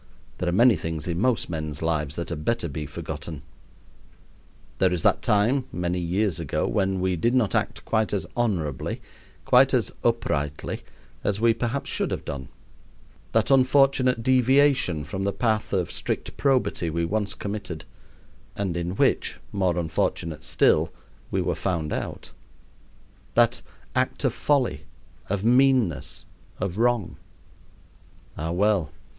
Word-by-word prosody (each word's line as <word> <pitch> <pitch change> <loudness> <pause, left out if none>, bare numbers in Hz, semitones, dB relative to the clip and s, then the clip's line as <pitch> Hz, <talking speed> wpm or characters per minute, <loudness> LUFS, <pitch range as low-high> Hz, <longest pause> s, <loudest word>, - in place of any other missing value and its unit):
There 90 - 0
are - - +1
many 115 +5 +5
things 80 -1 -4
in 85 -1 -1
most 125 -1 +1
men's 75 -2 -4
lives 75 -3 -1
that 85 -1 -4
had 80 -3 -4
better 115 0 0
be 75 0 -5
forgotten. 80 -1 -6 1.4
There 95 -1 +4
is 90 -3 -1
that - - +3
time, 115 +6 +2
many 90 0 -1
years 90 +1 0
ago, 80 -4 -1
when 95 -1 0
we 95 0 +1
did 120 +10 +1
not 120 -6 +2
act - - -1
quite 110 -1 +1
as 100 - -1
honorably, 90 - -1 0.5
quite - - +5
as - - +1
uprightly, 70 +1 -1 0.4
as 100 0 0
we 115 0 +4
perhaps 120 +4 -2
should - - 0
have - - -4
done 70 -2 -5 0.9
that 115 +4 +2
unfortunate 130 -2 +4
deviation 130 - +3
from 95 +7 -4
the 100 - +1
path 110 -1 0
of 90 -5 0
strict - - -3
probity 130 -10 +1
we 85 +1 -1
once 100 +1 -1
committed, 100 -7 -5 0.7
and 95 -4 -2
in 85 +1 -2
which, - - +2
more 95 -3 +1
unfortunate 80 -1 -1
still, 80 -1 +3 0.4
we - - 0
were - - 0
found 85 -5 -2
out - - -5 1.0
that - - +4 0.3
act - - 0
of - - +2
folly, 140 -4 +1 0.4
of 100 0 -1
meanness, 125 - +2 0.3
of 95 +1 -3
wrong. 115 -9 +1 1.2
Ah, 80 +1 -3
well! 95 -4 +2
95 Hz, 140 wpm, -25 LUFS, 80-115 Hz, 1.4 s, many